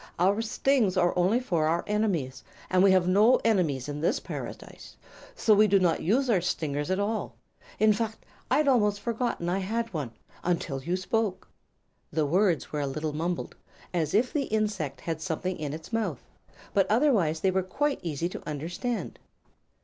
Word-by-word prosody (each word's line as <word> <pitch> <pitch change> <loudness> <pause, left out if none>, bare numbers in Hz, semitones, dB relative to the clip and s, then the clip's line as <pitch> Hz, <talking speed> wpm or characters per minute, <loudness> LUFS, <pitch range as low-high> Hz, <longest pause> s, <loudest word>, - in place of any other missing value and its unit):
"Our 195 +5 +2
stings 230 -3 +1
are 175 -1 +3
only 185 +7 +3
for 170 -11 0
our 170 +2 +1
enemies, 195 -11 -1 0.3
and 185 0 +4
we 195 - +6
have 185 -1 +3
no 210 +7 +5
enemies 165 - +1
in 145 0 -5
this 165 - +1
Paradise; - - -8 0.4
so 220 - +4
we 210 +1 +5
do 200 0 +4
not 180 -3 +2
use 245 - +2
our 205 -7 +3
stingers 145 -4 -2
at 185 +1 +1
all. 210 +2 -2 0.4
In 215 0 +5
fact, 220 +1 -4 0.2
I'd 300 -1 +3
almost 210 -6 +3
forgotten 235 -6 -2
I 180 +2 0
had 225 +3 -2
one, 145 -7 -3 0.3
until 165 -6 -1
you 175 +7 -1
spoke." 200 +1 -1 0.6
The 155 0 +1
words 175 +1 +1
were 150 - -2
a 140 - -1
little 150 +3 -3
mumbled, 170 +3 -3 0.4
as 165 -1 0
if 240 +4 +2
the 285 -3 0
insect 205 - -2
had 160 -2 -4
something 180 +1 -3
in 150 -2 -3
its 160 +8 -8
mouth, 205 - -1 0.5
but 195 -2 +2
otherwise 210 - +2
they 190 - +3
were 190 +1 +1
quite 275 +10 -1
easy 165 0 -2
to - - -7
understand. 175 - -4
185 Hz, 175 wpm, -27 LUFS, 160-220 Hz, 0.6 s, we